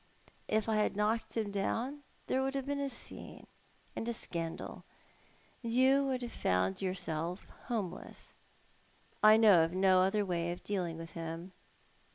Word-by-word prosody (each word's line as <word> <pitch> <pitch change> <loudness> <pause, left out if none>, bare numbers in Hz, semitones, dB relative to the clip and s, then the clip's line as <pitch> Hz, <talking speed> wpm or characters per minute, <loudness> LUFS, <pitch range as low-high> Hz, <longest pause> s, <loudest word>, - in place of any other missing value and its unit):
" - - -32
If 215 0 +1
I 220 -1 +2
had 210 -1 +1
knocked 215 +3 0
him 215 -2 -1
down 235 +8 -1 0.2
there 265 - +1
would 270 +1 -1
have 270 -1 -1
been 285 0 -2
a 280 -1 -1
scene - - -9 0.5
and 230 - -3
a - - 0
scandal; 165 -7 -5 0.8
and 230 -2 -3
you 265 +3 +5
would 255 -2 -1
have 240 - -5
found 95 +1 0
yourself 180 -1 -2 0.2
homeless. 205 -7 -4 0.9
I 215 +1 +8
know 205 -7 +7
of 165 +1 -1
no 185 0 +5
other 200 +2 +2
way 175 -2 -1
of 175 - -7
dealing 180 -5 -2
with 165 0 -8
him." 165 +2 -6
205 Hz, 165 wpm, -33 LUFS, 175-235 Hz, 0.9 s, I